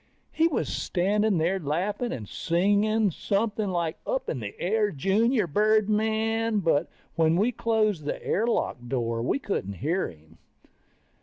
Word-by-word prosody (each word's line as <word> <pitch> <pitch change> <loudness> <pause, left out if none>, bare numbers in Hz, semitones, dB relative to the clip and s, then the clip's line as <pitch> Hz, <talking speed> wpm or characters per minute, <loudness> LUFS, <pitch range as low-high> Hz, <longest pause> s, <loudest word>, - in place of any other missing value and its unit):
He 325 - +3
was 320 - -1
standing 205 +2 +1
there 175 +4 +1
laughing 185 - -2
and 110 -5 -5
singing 205 - +1
something 205 +3 -1
like 170 -3 -2
up 260 0 -1
in 135 - -3
the 105 -3 -7
air 210 +3 +1
junior 205 - +1
birdmen, 220 +3 +1
but 165 -2 +1 0.3
when 160 -1 +3
we 215 +6 +2
closed 215 -8 0
the - - -4
air 220 +5 +1
lock 235 - 0
door, 115 -2 -1
we 125 - 0
couldn't 195 - -3
hear 160 - -1
him. 80 0 -18
200 Hz, 145 wpm, -26 LUFS, 160-220 Hz, 0.3 s, He